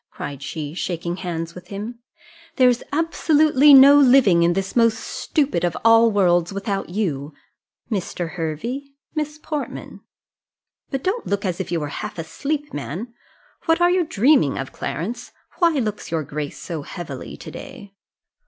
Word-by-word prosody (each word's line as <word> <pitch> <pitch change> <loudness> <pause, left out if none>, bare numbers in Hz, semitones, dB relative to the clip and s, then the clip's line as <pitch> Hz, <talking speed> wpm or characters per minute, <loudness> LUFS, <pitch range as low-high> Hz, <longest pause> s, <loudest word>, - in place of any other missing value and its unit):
cried 140 -1 -7
she, 150 +1 -5
shaking 175 0 -3
hands 170 -2 -4
with 180 0 -12
him: 210 +5 -6 0.6
"there's 250 -2 +4
absolutely 300 -2 +4
no 275 +1 +9
living 250 -10 +5
in 170 +1 +3
this 195 +1 -3
most 230 -2 +4
stupid 275 - -1
of 175 -2 0
all 230 0 +7
worlds 175 -3 +2
without 200 -1 -3
you. 160 -8 -2 0.6
Mr. 175 -4 -3
Hervey 180 - -3 0.3
Miss 300 -1 -3
Portman 305 -1 -6 0.9
but 270 -2 -3
don't 425 +5 -1
look 200 0 -1
as 180 -1 -2
if 190 - -4
you 170 - 0
were 150 -1 -4
half - - -6
asleep, 280 - -4
man 180 - -5 0.5
What 325 +1 +3
are 350 0 +4
you 365 -1 +3
dreaming 265 - +3
of, 135 - -5
Clarence? 190 - -5 0.3
Why 340 -2 +5
looks 220 -8 -2
your 160 -2 -1
grace 145 +1 -5
so 165 -4 -5
heavily 175 +4 -8
to - - -10
day?" 225 -8 -10
200 Hz, 155 wpm, -22 LUFS, 170-275 Hz, 0.9 s, no